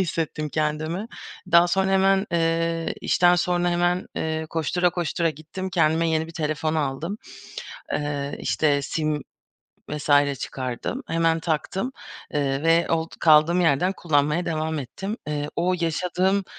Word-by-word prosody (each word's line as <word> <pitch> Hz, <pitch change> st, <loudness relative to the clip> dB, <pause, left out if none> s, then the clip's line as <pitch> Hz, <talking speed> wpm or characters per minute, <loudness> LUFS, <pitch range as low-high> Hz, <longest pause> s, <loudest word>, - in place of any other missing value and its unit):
hissettim 160 Hz, -4 st, -2 dB
kendimi. 155 Hz, +6 st, -2 dB, 0.5 s
Daha 170 Hz, +1 st, +7 dB
sonra 190 Hz, +2 st, +1 dB
hemen 195 Hz, +1 st, +3 dB
eee, 165 Hz, 0 st, 0 dB
işten 175 Hz, 0 st, +4 dB
sonra 175 Hz, 0 st, +1 dB
hemen, 175 Hz, +1 st, +1 dB
eee, 160 Hz, 0 st, -2 dB
koştura 175 Hz, +2 st, +1 dB
koştura 170 Hz, -1 st, -1 dB
gittim 170 Hz, +5 st, -7 dB
kendime 165 Hz, -1 st, +2 dB
yeni 160 Hz, 0 st, 0 dB
bir 165 Hz, -, -11 dB
telefon 155 Hz, 0 st, -1 dB
aldım. 155 Hz, +6 st, -2 dB, 0.8 s
Eee, 145 Hz, -1 st, -2 dB
işte 145 Hz, -2 st, +1 dB
sim 155 Hz, +1 st, -1 dB, 0.7 s
vs. 145 Hz, -2 st, +2 dB
çıkardım, 130 Hz, -1 st, -4 dB
hemen 165 Hz, 0 st, +2 dB
taktım, 175 Hz, -, -2 dB, 0.4 s
eee, 140 Hz, -1 st, 0 dB
ve 165 Hz, +1 st, +4 dB
old 165 Hz, 0 st, 0 dB
kaldığım 160 Hz, +3 st, +5 dB
yerden 170 Hz, +3 st, +2 dB
kullanmaya 150 Hz, +2 st, +1 dB
devam 160 Hz, -1 st, -1 dB
ettim. 195 Hz, -, -5 dB
Eee, 150 Hz, -1 st, -2 dB
o 180 Hz, +1 st, +1 dB
yaşadığım, 185 Hz, +4 st, 0 dB
165 Hz, 130 wpm, -24 LUFS, 150-175 Hz, 0.8 s, Daha